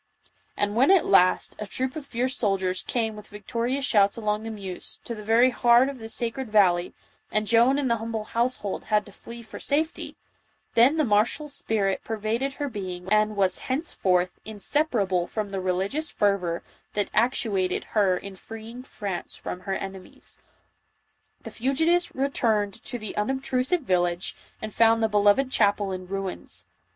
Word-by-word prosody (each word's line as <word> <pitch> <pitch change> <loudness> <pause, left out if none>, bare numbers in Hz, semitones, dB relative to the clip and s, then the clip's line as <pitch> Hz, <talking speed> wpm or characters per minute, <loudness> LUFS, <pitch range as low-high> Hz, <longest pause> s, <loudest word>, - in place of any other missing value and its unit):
And 205 0 0
when, 260 +5 +4
at 385 -3 +5
last, 185 -2 +4
a 210 - -5
troop 260 +5 -2
of 300 -3 -7
fierce 255 +2 -1
soldiers 190 -3 0
came 225 -3 -1
with 210 0 -11
victorious 235 +6 -2
shouts 200 -5 +3
along 210 -1 -1
the 225 - -6
Meuse, 195 -4 -7
to 235 - -5
the 215 - -7
very 230 +4 +4
heart 240 +2 +5
of 275 -2 -7
the 225 0 -7
sacred 235 +1 -3
valley, 180 -4 +3 0.4
and 215 0 +1
Joan 235 +5 +4
and 285 -2 0
the 235 -1 +2
humble 225 -1 -4
household 230 -2 -2
had 210 -1 +1
to 205 - -13
flee 235 +4 -11
for 220 - -10
safety, 310 +3 -1 0.6
then 250 +7 +5
the 310 - +3
martial 220 +7 +2
spirit 205 -8 -1
pervaded 225 +5 -2
her 290 0 -3
being 190 -4 -4
and 215 0 +3
was 190 -2 +1
henceforth 185 - +1
inseparable 205 - 0
from 210 -2 -4
the 195 -1 -3
religious 190 - -1
fervor 185 -5 0 0.3
that 205 -1 0
actuated 210 -6 +1
her 195 -4 +3
in 195 +1 -8
freeing 225 +5 -9
France 200 -8 -5
from 180 - -6
her 190 +1 -3
enemies. 190 -1 -8 1.0
The - - -8
fugitives 320 +8 +1
returned 225 -7 0
to 245 +3 -4
the 215 -2 -7
unobtrusive 265 +7 0
village 175 -5 0 0.3
and 215 -1 -5
found 225 0 +4
the 220 - +3
beloved 210 +6 +3
chapel 205 -3 +2
in 185 -1 -5
ruins. 195 -1 -4
215 Hz, 165 wpm, -26 LUFS, 195-250 Hz, 1.0 s, at